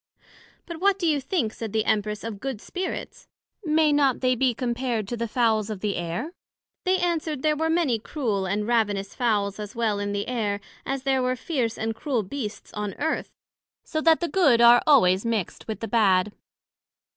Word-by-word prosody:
But 340 -2 -7
what 395 0 +3
do 370 - -2
you 300 -4 +2
think, 260 - -1
said 225 -3 -6
the 220 -1 +1
Empress, 210 0 0
of 225 -3 -5
good 265 -3 -4
Spirits? 365 - -6 0.4
may 310 -2 +3
not 280 -3 +2
they 255 -1 +3
be 250 -1 +1
compared 240 -3 -2
to 240 - -2
the 235 0 -3
Fowls 220 -2 +1
of 210 -3 -5
the 205 -2 -1
Air? 175 - -4 0.5
They 370 0 +3
answered, 325 -5 -1
There 305 -1 +3
were 320 +2 0
many 320 -9 +2
cruel 215 -7 -2
and 205 +3 -1
ravenous 205 -4 0
Fowls 210 -4 0
as 210 +1 -7
well 220 -3 0
in 205 0 -2
the 200 0 -2
Air, 215 -5 -1 0.3
as 270 -1 -2
there 270 -1 +2
were 255 0 0
fierce 250 -5 -2
and 225 +1 -2
cruel 245 -1 -1
Beasts 215 +1 -6
on 210 -2 -4
Earth; 320 +2 -2 0.5
so 315 - -3
that 325 +1 +4
the 345 - 0
good 310 -11 +4
are 235 0 +7
always 190 -10 +5
mixt 225 -6 -3
with 220 - -5
the 225 - -3
bad. 205 -4 +3
235 Hz, 190 wpm, -25 LUFS, 210-290 Hz, 0.5 s, are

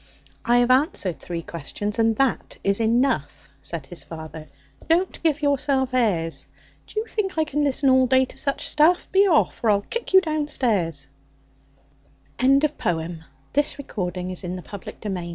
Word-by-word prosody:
"I 240 +1 +3
have 245 +1 +3
answered 255 - +1
three 170 -1 -5
questions, 205 +8 -5
and 225 0 +3
that 270 +1 0
is 200 +1 +2
enough," 230 - 0
Said 165 -2 -5
his 170 +5 -8
father. 160 -1 -9 0.4
"Don't 350 +3 +1
give 310 -2 +1
yourself 275 -2 +1
airs! 185 -10 0 0.4
Do 430 - -3
you 440 - -3
think 385 -6 -3
I 315 - +4
can 295 -1 -1
listen 280 0 +1
all 260 -1 +5
day 260 +1 +4
to - - -12
such 275 -2 -1
stuff? 325 +4 +3
Be 390 +1 +5
off, 320 -8 +2
or 225 - +3
I'll 200 -1 +3
kick 470 - -5
you 380 - +10
down 310 -4 -1
stairs. 175 - 0 1.3
Lewis 275 +3 +4
Carroll 165 0 -2 0.4
Speak 285 -1 -6
roughly 180 -1 -3
to 180 - -4
your 180 - -3
little 200 +2 -7
boy... 175 -2 -4
245 Hz, 170 wpm, -23 LUFS, 180-290 Hz, 1.3 s, you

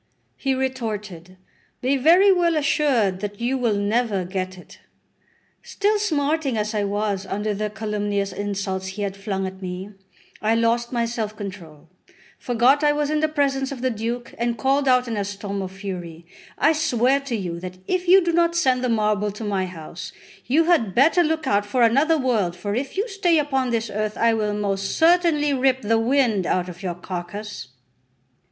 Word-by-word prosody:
He 270 -1 -1
retorted: 210 -9 -4 0.4
"Be 260 +3 +1
very 345 +9 +6
well 345 -3 +2
assured 275 -10 +1
that 205 0 -5
you 245 +3 0
will 240 -5 +1
never 205 -1 0
get 185 0 -4
it." 180 - -15 0.8
Still 415 +1 0
smarting 305 - 0
as 210 +1 -1
I 210 -1 0
was 200 -1 -2
under 210 +2 -2
the 210 +1 -2
calumnious 205 -2 -2
insults 195 -1 -3
he 195 +2 -5
had 195 -1 -3
flung 195 -1 -3
at 190 0 -7
me, 185 +2 -6 0.5
I 220 +1 +2
lost 230 +1 +1
my 235 -2 0
self 225 -2 -3
control, 170 -7 -9 0.5
forgot 250 +4 +3
I 295 0 +4
was 295 0 -1
in 305 - +1
the 310 - +2
presence 275 -3 0
of 265 -3 -6
the 255 0 +1
Duke, 235 +2 -4
and 235 0 0
called 270 +4 +1
out 250 -1 +4
in 230 - -3
a 205 - -1
storm 200 0 -5
of 185 -1 -5
fury: 180 -4 -7 0.3
"I 320 - +4
swear 270 -3 +2
to 275 -4 -4
you 175 -5 -4
that 185 +1 -8
if 365 -1 -1
you 375 +1 +7
do 340 - +2
not 340 0 +2
send 260 -6 +2
the 250 - +1
marble 210 -2 +1
to 210 - -8
my 195 -3 -1
house, 170 -1 -8 0.3
you 305 +6 +3
had 290 - +2
better 315 +7 +5
look 320 -1 0
out 205 -5 +2
for 235 +4 +1
another 280 +8 +4
world, 225 - 0
for 200 +3 -4
if 265 - -3
you 410 +5 0
stay 380 -6 +2
upon 270 -4 0
this 230 -1 -1
earth 215 +1 -2
I 230 0 +3
will 210 -2 -1
most 195 -1 -2
certainly 325 -3 +3
rip 265 -1 +1
the 225 +2 +2
wind 230 -6 +2
out 180 0 0
of 175 +1 -10
your 180 -3 -3
carcass. 175 -3 -6
225 Hz, 185 wpm, -23 LUFS, 200-275 Hz, 0.8 s, you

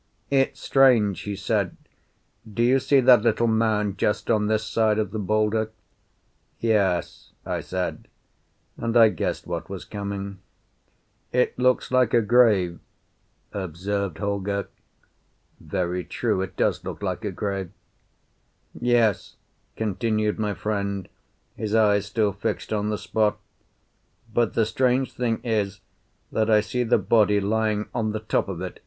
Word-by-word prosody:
"It's 135 -1 +2
strange," 120 -8 +4
he 100 -1 -4
said. 100 -1 -1 0.7
"Do 115 +3 0
you 130 +3 +4
see 135 +1 +3
that 125 -3 +7
little 115 +1 +2
mound 110 -3 +1
just 105 - 0
on 105 -2 +2
this 110 0 +1
side 110 -1 +1
of 110 - -1
the 110 - -3
boulder?" 110 +2 +1 0.9
"Yes," 100 -6 0
I - - -2
said, 90 -1 -4 0.7
and 115 +1 0
I 115 -2 +8
guessed 90 - -3
what 85 +2 -5
was 95 -2 -7
coming. 100 -1 -5 0.9
"It 125 0 +1
looks 125 0 +2
like 125 -2 +3
a 120 - +5
grave," 105 -7 +3 0.7
observed 95 0 -3
Holger. 100 0 -2 0.9
"Very 90 -1 -2
true. 95 - -1
It 95 - -6
does - - +1
look - - -7
like 95 +2 -3
a 105 - -2
grave." 95 -1 -3 1.0
"Yes," 120 -4 +1 0.4
continued 110 0 -1
my 105 -2 -1
friend, 100 -2 -3 0.5
his 110 0 -2
eyes 105 -2 +3
still 105 -1 +1
fixed 100 - -3
on 105 0 0
the 105 - -1
spot. 105 0 0 1.0
"But 115 -1 +1
the 115 - +3
strange 125 +3 +1
thing 115 -2 -1
is 105 -4 -1 0.5
that 110 0 +1
I 110 -1 +6
see 125 +4 -2
the 120 -1 +3
body 105 0 +3
lying 105 +1 0
on 110 -2 -1
the 110 - -2
top 110 - 0
of 90 -2 -5
it. 95 -1 -6
105 Hz, 140 wpm, -24 LUFS, 100-115 Hz, 1.0 s, I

